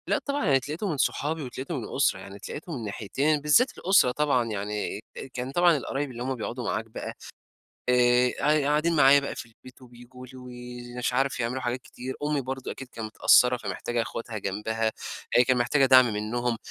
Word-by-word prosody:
لأ، -, -, +2 dB
طبعًا 285 Hz, 0 st, -2 dB
يعني 140 Hz, -3 st, +4 dB
اتلاقيتُه 150 Hz, -, -4 dB
من 155 Hz, -, -2 dB
صحابي 155 Hz, +3 st, -1 dB
واتلاقيتُه 135 Hz, +5 st, -5 dB
من 120 Hz, -, -4 dB
الأسرة 130 Hz, -3 st, 0 dB
يعني، 95 Hz, +1 st, -10 dB
اتلاقيتُه 150 Hz, -, -8 dB
من -, -, -3 dB
الناحيتين، 120 Hz, +8 st, -1 dB
بالذات 150 Hz, -, +3 dB
الأسرة 185 Hz, -9 st, +4 dB
طبعًا، 135 Hz, -3 st, +1 dB
يعني 105 Hz, 0 st, -3 dB, 0.3 s
كان 125 Hz, +1 st, -4 dB
طبعًا 175 Hz, +1 st, +4 dB
القرايب 140 Hz, 0 st, -3 dB
اللي 120 Hz, 0 st, -6 dB
هم 130 Hz, +1 st, -2 dB
بيقعدوا 120 Hz, +1 st, -5 dB
معاك 110 Hz, -, -2 dB
بقى، 110 Hz, -, -7 dB, 0.8 s
آآ، 125 Hz, 0 st, +4 dB
ق 150 Hz, 0 st, +3 dB
قاعدين 155 Hz, +3 st, +2 dB
معايا 140 Hz, -1 st, +7 dB
بقى 140 Hz, -, -5 dB
في -, -, -7 dB
البيت، 130 Hz, +3 st, -17 dB
وبييجوا 125 Hz, +1 st, -13 dB
لي، 130 Hz, -, -13 dB
وي 125 Hz, -1 st, -9 dB
مش 125 Hz, -, -1 dB
عارف 135 Hz, 0 st, 0 dB
يعملوا 125 Hz, +3 st, -2 dB
حاجات 125 Hz, 0 st, -2 dB
كتير، 130 Hz, +1 st, -8 dB
أمي 145 Hz, -1 st, 0 dB
برضه 130 Hz, 0 st, -5 dB
أكيد 135 Hz, -, -8 dB
كانت 115 Hz, -3 st, -6 dB
متأثّرة 125 Hz, +3 st, +5 dB
فمحتاجة 115 Hz, +2 st, -3 dB
اخواتها 115 Hz, -1 st, -5 dB
جنبها، 110 Hz, +3 st, -2 dB, 0.4 s
هي 125 Hz, -, +6 dB
كانت 125 Hz, 0 st, +2 dB
محتاجة 135 Hz, +3 st, +3 dB
دعم 130 Hz, -1 st, +8 dB
منِّهم، 115 Hz, +3 st, -1 dB
125 Hz, 190 wpm, -26 LUFS, 120-140 Hz, 0.8 s, دعم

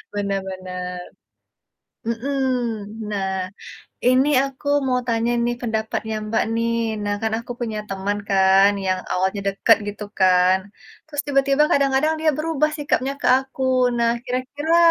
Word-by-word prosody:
Benar 200 Hz, -1 st, -1 dB
benar. 180 Hz, -1 st, -6 dB, 1.1 s
Mhm. 235 Hz, +5 st, -2 dB, 0.7 s
Nah, 195 Hz, -2 st, -1 dB, 0.8 s
ini 255 Hz, +3 st, +4 dB, 0.2 s
aku 275 Hz, +1 st, -8 dB, 0.2 s
mau 250 Hz, -1 st, +2 dB
tanya 230 Hz, 0 st, +1 dB
nih 240 Hz, 0 st, 0 dB
pendapatnya 220 Hz, -1 st, -2 dB
Mbak, 220 Hz, +1 st, +1 dB
nih. 230 Hz, 0 st, 0 dB, 0.3 s
Nah, 205 Hz, 0 st, 0 dB
kan 220 Hz, 0 st, 0 dB
aku 235 Hz, +1 st, -6 dB
punya 220 Hz, -3 st, -3 dB
teman 195 Hz, +1 st, -2 dB
kan 195 Hz, 0 st, +5 dB
yang 185 Hz, -1 st, +1 dB
awalnya 190 Hz, +2 st, 0 dB
dekat 195 Hz, +3 st, +4 dB
gitu 205 Hz, +1 st, -6 dB
kan, 185 Hz, 0 st, +5 dB, 0.5 s
terus 295 Hz, -2 st, -2 dB
tiba-tiba 275 Hz, +1 st, +3 dB
kadang-kadang 280 Hz, +2 st, +2 dB
dia 315 Hz, 0 st, +3 dB
berubah 305 Hz, -1 st, 0 dB
sikapnya 275 Hz, -2 st, 0 dB
ke -, -, -1 dB
aku, 265 Hz, 0 st, -8 dB, 0.3 s
nah 235 Hz, 0 st, +2 dB
kira-kira 285 Hz, +6 st, -1 dB
230 Hz, 135 wpm, -22 LUFS, 195-270 Hz, 1.1 s, kan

